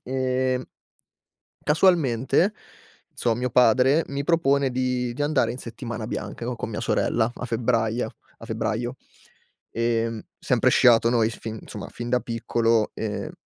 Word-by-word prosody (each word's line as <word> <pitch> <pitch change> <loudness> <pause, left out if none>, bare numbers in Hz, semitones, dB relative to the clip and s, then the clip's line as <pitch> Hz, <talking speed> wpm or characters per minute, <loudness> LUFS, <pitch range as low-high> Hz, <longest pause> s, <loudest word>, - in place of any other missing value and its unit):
Ehm 130 0 0 1.0
casualmente, 155 - +3 0.6
inso 115 -2 0
mio 125 +2 -2
padre 125 +6 +4
mi 140 0 -3
propone 140 -5 +2
di 125 -1 -1
di 145 - -4
andare 145 -6 +2
in 125 - -8
settimana 115 -2 -6
bianca 120 - -5
co 125 - -2
con 115 - -5
mia 105 - -4
sorella 115 0 +1
a - - -6
febbraio 115 -1 0 0.3
a - - -9
febbraio. 120 +3 -2 0.8
Ehm, 115 -1 -1 0.2
sempre - - +2
sciato 115 -1 +5
noi, 115 -2 +3
f - - -9
fin 110 -1 -6
somma, - - -7
fin 120 0 -6
da 125 -1 +2
piccolo, 115 -1 0
ehm 105 -1 -4
120 Hz, 145 wpm, -24 LUFS, 115-130 Hz, 1.0 s, sciato